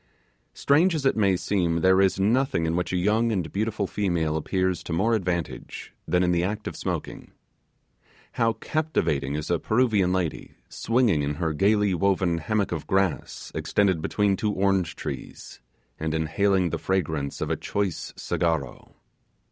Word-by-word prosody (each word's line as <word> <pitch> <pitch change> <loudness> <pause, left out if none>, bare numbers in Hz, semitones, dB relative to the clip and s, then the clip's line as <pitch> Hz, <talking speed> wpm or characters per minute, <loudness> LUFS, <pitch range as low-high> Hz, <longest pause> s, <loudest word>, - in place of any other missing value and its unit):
Strange 165 +5 +3
as 145 -3 -3
it 135 - +3
may 100 -4 +2
seem, 85 -2 0
there 95 +1 +5
is 95 0 +2
nothing 110 -3 +2
in 80 +1 0
which 90 0 -1
a 90 - 0
young 110 +5 +2
and 90 -6 -2
beautiful 110 0 -1
female 85 -6 -1
appears 95 +3 -1
to - - -8
more 105 +8 +1
advantage 90 -5 -3
than 90 0 +2
in 90 - +2
the 85 0 +1
act 105 +3 -3
of - - -5
smoking. - - -5 1.0
How 115 -1 +1
captivating 110 - -1
is 75 +3 -3
a 85 - +2
Peruvian 110 -6 +2
lady, 90 -4 -2
swinging 115 - +1
in 70 +1 -2
her 80 0 -1
gaily 100 +4 +2
woven 90 -2 +1
hammock 105 +3 -1
of 85 -4 -4
grass, 95 -2 -1
extended 95 -5 +1
between 100 +3 +1
two 105 +2 -1
orange 95 -3 +1
trees, - - -8 0.4
and 80 0 -2
inhaling 90 +3 +1
the - - -2
fragrance 80 -7 -2
of - - -2
a - - +2
choice 100 -4 -3
cigarro! 80 -8 -2
95 Hz, 160 wpm, -25 LUFS, 85-105 Hz, 1.0 s, there